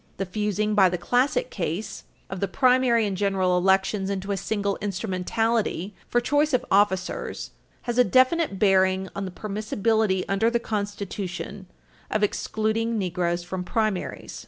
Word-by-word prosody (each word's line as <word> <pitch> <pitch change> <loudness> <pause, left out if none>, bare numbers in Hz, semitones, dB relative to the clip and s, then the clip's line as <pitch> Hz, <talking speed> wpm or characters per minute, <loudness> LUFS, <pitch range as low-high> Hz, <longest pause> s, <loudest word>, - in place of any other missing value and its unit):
The 195 - -2
fusing 210 +2 -1
by 195 -3 +5
the 180 - -2
Classic 260 - +1
case 205 - -4 0.2
of 190 - -6
the 200 - 0
primary 250 0 +3
and 200 -2 -2
general 190 -2 +1
elections 190 +2 +2
into 195 0 -3
a - - +1
single 200 0 -2
instrumentality 205 +1 -1 0.2
for 240 - +3
choice 290 +4 +1
of 250 - -1
officers 190 -2 0 0.3
has 240 -1 -1
a - - +8
definite 255 - +3
bearing 190 -1 +3
on 195 - -3
the - - -4
permissibility 215 0 0
under 195 +4 +2
the 235 0 +1
Constitution 200 -3 -4 0.4
of 215 0 0
excluding 220 +2 0
Negroes 175 -2 -1
from 180 +1 -4
primaries. 215 -1 -2
200 Hz, 145 wpm, -25 LUFS, 190-225 Hz, 0.4 s, a